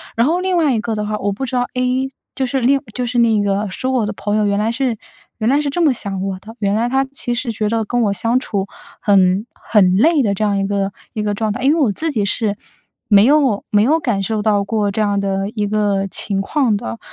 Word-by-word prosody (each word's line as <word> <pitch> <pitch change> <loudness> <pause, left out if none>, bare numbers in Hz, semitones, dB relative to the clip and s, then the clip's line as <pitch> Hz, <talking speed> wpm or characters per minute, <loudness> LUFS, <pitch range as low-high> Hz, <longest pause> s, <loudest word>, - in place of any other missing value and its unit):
然 230 +3 +3
后 345 +4 +1
另 370 -1 0
外 305 -5 +3
一 - - 0
个 230 -1 -3
的 210 0 -2
话， 210 0 -2
我 205 0 -1
不 265 +7 -4
知 255 0 -4
道 245 0 +1
A， 255 +1 0 0.3
就 265 - 0
是 265 +2 -1
另 270 +2 +3
就 250 +2 -2
是 240 0 -2
那 225 -3 +3
个 200 +1 0
说 255 +8 -3
我 250 -4 +1
的 210 - -3
朋 205 +1 -2
友 210 - +2
原 200 0 +1
来 220 +2 +1
是 250 -2 -1 0.4
原 220 +2 +1
来 280 - +3
是 290 - -1
这 345 +5 -1
么 300 -5 +4
想 195 -5 -4
我 195 -1 -3
的， 220 +4 -12
原 200 -1 0
来 230 +2 +1
他 270 +1 +2
其 265 -2 -4
实 240 0 -2
觉 215 -1 -2
得 225 0 0
跟 245 +3 0
我 200 -2 +1
相 230 +5 +1
处， 200 -6 -3 0.3
很 195 0 +3
很 185 -4 +2
累 305 +6 +4
的 205 -3 +1
这 215 - -2
样 205 -1 +1
一 195 - 0
个 200 -1 -1 0.2
一 215 - -3
个 205 -1 0
状 215 +1 -1
态。 205 - -5
因 280 - +4
为 330 - 0
我 235 - +3
自 315 +10 -2
己 215 -7 0
是 205 +1 -1 0.5
没 205 -1 +6
有 270 -6 +3
没 205 - +4
有 310 +6 +3
感 230 -9 -1
受 215 +1 -1
到 205 -2 +2
过， 205 -1 -1
这 215 - -1
样 205 -1 +1
的 195 0 -1
一 210 -2 -2
个 205 -2 0
情 195 -1 -1
况 235 -2 +1
的。 110 - -6
215 Hz, 285 characters per minute, -18 LUFS, 200-255 Hz, 0.5 s, 没